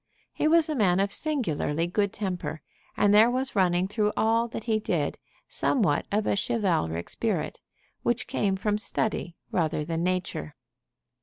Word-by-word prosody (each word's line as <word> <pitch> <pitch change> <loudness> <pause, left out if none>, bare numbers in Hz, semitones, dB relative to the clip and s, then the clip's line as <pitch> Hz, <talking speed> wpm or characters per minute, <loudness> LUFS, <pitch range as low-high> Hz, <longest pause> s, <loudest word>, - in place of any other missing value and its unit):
He - - +1
was 330 0 +5
a 310 - -1
man 190 -9 +3
of 200 +1 +1
singularly 170 - 0
good 200 +3 0
temper, 180 -6 -4 0.3
and 205 0 +4
there 220 +3 +7
was 260 +1 -2
running 180 -1 +2
through 210 +1 0
all 230 +1 +2
that 225 - -6
he 220 -2 +1
did 215 - -1 0.3
somewhat 195 - +1
of 210 +1 +1
a - - +2
chivalric 180 - 0
spirit, - - -2 0.4
which 240 0 0
came 205 -7 0
from 210 +2 0
study 210 -5 -2 0.2
rather 155 -3 0
than 165 +1 -2
nature. 180 - -2
200 Hz, 155 wpm, -27 LUFS, 175-225 Hz, 0.4 s, there